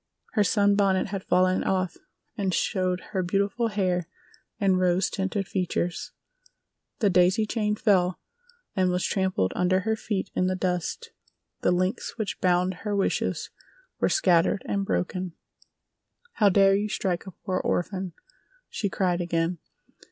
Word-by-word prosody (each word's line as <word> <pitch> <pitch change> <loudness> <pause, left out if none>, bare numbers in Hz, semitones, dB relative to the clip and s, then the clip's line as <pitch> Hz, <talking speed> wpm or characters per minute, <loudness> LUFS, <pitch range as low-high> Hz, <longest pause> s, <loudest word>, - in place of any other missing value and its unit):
Her 210 - +3
sunbonnet 200 -1 +2
had 195 -1 -4
fallen 185 +1 +3
off 185 -2 0 0.4
and 190 -3 0
showed 185 -1 0
her 190 -3 0
beautiful 200 +5 0
hair 185 -5 0 0.5
and 190 -3 +3
rose 180 +1 +2
tinted 195 0 -2
features. 180 -2 -2 0.9
The 205 -4 +2
daisy 180 +4 +4
chain 210 -1 0
fell 185 -4 +2 0.6
and 185 -1 +2
was 180 0 0
trampled 190 - 0
under 185 +1 +2
her 220 +2 0
feet 200 -3 -3
in 185 - +1
the 185 - 0
dust—the 185 - -4
links 185 +5 -1
which 215 -3 -3
bound 180 0 +2
her 210 -2 -2
wishes 200 - -1 0.5
were - - +2
scattered 180 - +3
and 200 0 0
broken. 180 -1 -2 1.0
"How 210 -2 +4
dare 195 0 +5
you 205 +1 -1
strike 185 -2 -2
a - - -6
poor 185 0 -3
orphan?" 185 0 -2 0.6
she 205 - -2
cried 180 -2 0
again. 170 0 -1
185 Hz, 135 wpm, -26 LUFS, 180-200 Hz, 1.0 s, dare